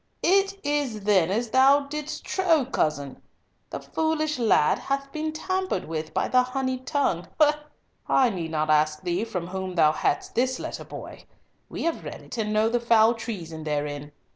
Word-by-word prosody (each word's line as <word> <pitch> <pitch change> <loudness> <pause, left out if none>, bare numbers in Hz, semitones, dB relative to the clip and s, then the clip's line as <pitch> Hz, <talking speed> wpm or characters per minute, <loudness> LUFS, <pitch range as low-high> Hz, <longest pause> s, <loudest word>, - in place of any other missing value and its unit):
It 390 +2 +3
is 285 -7 -1
then 195 -4 +3
as 225 +3 -1
thou 275 +2 +6
didst 300 +2 -6
trow, 330 -7 +2
cousin, 150 - -2 0.5
the - - -5
foolish 310 -2 -1
lad 220 -10 +3
hath 275 0 -3
been 310 +1 -3
tampered 370 +4 -2
with 160 -1 -4
by - - 0
the 255 - +4
honeyed 260 0 -3
tongue. 190 - 0 0.8
I 255 -3 +4
need 170 -5 -4
not 155 -1 0
ask 155 +1 +2
thee 180 +3 -1
from 185 -7 -4
whom 190 -1 -4
thou 155 -3 +5
hadst 145 -1 -1
this 255 +2 +1
letter, - - -6
boy. - - -10 0.4
We - - -5
have 335 -1 -1
read - - -8
it 240 - -7
and 210 -1 -1
know 215 +1 +3
the 240 +1 +1
foul 230 -1 +4
treason 175 -9 -6
therein. 145 -1 -3
230 Hz, 170 wpm, -25 LUFS, -, 0.8 s, thou